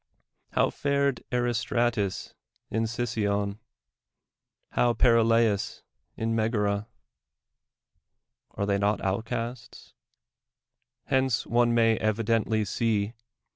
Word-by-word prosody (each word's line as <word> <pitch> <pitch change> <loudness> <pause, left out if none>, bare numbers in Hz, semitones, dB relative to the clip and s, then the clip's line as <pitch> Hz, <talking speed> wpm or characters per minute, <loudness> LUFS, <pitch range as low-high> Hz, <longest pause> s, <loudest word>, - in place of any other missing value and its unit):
il()v\' - - +3
fared 140 -2 0
Aris 120 -2 0
tratus 115 -5 -1 0.4
in 115 0 0
Sicyon? 105 -3 -1 1.1
how 120 -1 +2
Perilaiis 115 -3 +3 0.3
in 115 0 -1
]\legara? 105 -2 0 1.7
Ari> 100 - -1
they 100 0 +1
not 105 +1 +1
outcasts? 115 +4 -4 1.1
Hence 130 -3 +1
one 120 0 +2
may 115 -1 +4
evidently 110 0 +1
see. 105 0 0
115 Hz, 85 wpm, -27 LUFS, 105-120 Hz, 1.7 s, may